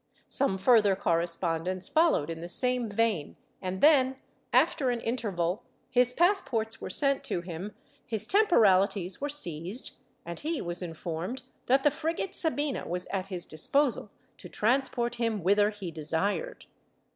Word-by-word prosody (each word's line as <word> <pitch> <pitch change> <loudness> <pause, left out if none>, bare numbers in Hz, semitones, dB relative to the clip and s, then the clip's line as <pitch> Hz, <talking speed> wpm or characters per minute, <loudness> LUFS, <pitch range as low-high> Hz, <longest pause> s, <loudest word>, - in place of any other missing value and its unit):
Some 260 -8 +2
further 205 -1 +4
correspondence 170 +1 -1
followed 310 - +2
in 165 0 -7
the 170 - -7
same 250 +2 +1
vein 210 -7 -1 0.2
and 185 0 -4
then, 265 -4 +5 0.4
after 265 -3 +2
an 240 -1 -1
interval, 205 -6 -2 0.3
his 250 0 +4
passports 250 - +1
were - - -5
sent 275 -2 +3
to 175 - -2
him, 180 +4 -7 0.3
his 220 -3 -2
temporalities 200 - +3
were 290 - -2
seized, 185 - -2 0.3
and 170 0 -6
he 320 +1 -3
was 175 +1 -3
informed 175 +8 -5 0.2
that 270 +2 +3
the 295 - +4
frigate 325 +5 -3
Sabina 295 -4 0
was 180 +1 -3
at 195 -1 -2
his 180 -3 -3
disposal 250 - 0 0.3
to - - -10
transport 240 0 0
him 225 -5 -1
whither 205 +3 +3
he 205 -5 -7
desired. 165 - -2
210 Hz, 145 wpm, -28 LUFS, 180-265 Hz, 0.4 s, then